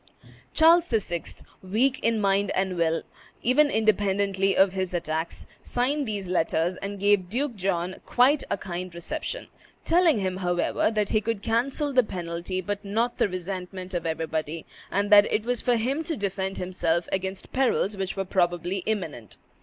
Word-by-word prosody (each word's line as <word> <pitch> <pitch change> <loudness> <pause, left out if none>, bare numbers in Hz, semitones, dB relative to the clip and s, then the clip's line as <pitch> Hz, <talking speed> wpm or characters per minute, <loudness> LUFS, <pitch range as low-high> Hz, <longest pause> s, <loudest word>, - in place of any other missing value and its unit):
Charles 330 +2 +6
VI., 185 -7 -1 0.4
weak 235 +8 +1
in 230 -1 +1
mind 200 0 +2
and 190 -1 0
will, 165 -1 +1 0.4
even 290 +5 +4
independently 200 -3 +1
of 190 -1 +5
his 185 -2 -2
attacks, 165 -1 -3 0.2
signed 270 +3 -1
these 205 -3 -3
letters, 175 0 +1
and 200 0 -5
gave 200 -2 +3
Duke 250 +3 -1
John 185 -2 -1
quite 270 +4 +3
a - - 0
kind 180 -1 -5
reception, 310 - -4 0.4
telling 335 -5 +4
him, 185 -2 -1
however, 175 +1 +1
that 210 -2 0
"he 215 - +2
could 220 -2 -3
cancel 275 +6 0
the 255 - +6
penalty, 175 -2 -4
but 205 +3 -4
not 225 +4 -1
the - - +3
resentment 185 0 -5
of 175 -2 -2
everybody, 160 0 -3 0.2
and 205 +2 0
that 205 0 +7
it 215 - 0
was 245 -1 0
for 245 - +2
him 260 +7 -1
to 320 - -3
defend 195 -1 -2
himself 175 -2 -1
against 190 0 -3
perils 245 -6 +1
which 190 -1 -3
were 195 - -1
probably 175 0 0
imminent." 160 - -3
195 Hz, 160 wpm, -26 LUFS, 180-230 Hz, 0.4 s, that